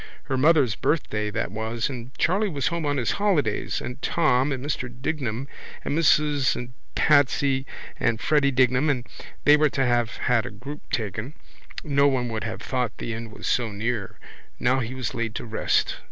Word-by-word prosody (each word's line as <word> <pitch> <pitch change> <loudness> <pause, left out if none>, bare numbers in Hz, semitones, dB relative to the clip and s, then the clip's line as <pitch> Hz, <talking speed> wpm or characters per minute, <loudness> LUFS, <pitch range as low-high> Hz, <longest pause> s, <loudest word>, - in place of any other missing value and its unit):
Her 135 - -2
mother's 140 -4 +4
birthday 105 -7 -1
that 105 - -2
was 110 +1 -2
and 125 -3 -6
Charley 200 +5 +2
was 145 -6 -1
home 170 -3 -2
on 145 0 0
his 120 - +1
holidays 155 - +1
and 125 +2 -6
Tom 145 -4 +2
and 135 0 -3
Mr 130 -4 -2
Dignam 130 -1 -3 0.4
and - - -1
Mrs 150 -4 +3
and 125 0 -6 0.2
Patsy 140 -2 +3 0.3
and 115 -2 +1
Freddy 145 0 +3
Dignam 130 +2 +3
and 125 -4 0 0.4
they 145 - +7
were 150 0 +3
to 135 -1 0
have 120 -2 +1
had 120 -1 +1
a - - -4
group 125 +7 -8
taken. 110 - -3 0.5
No 140 -1 +3
one 125 -3 0
would 110 -2 -3
have 110 - -5
thought 125 -3 -2
the 115 - -4
end 115 0 -6
was - - -9
so 120 -3 +1
near. 105 0 -3 0.4
Now 130 +2 +2
he 125 +1 -4
was 130 -3 -3
laid 115 -1 -3
to - - -4
rest. 110 -1 0
130 Hz, 180 wpm, -25 LUFS, 115-145 Hz, 0.5 s, they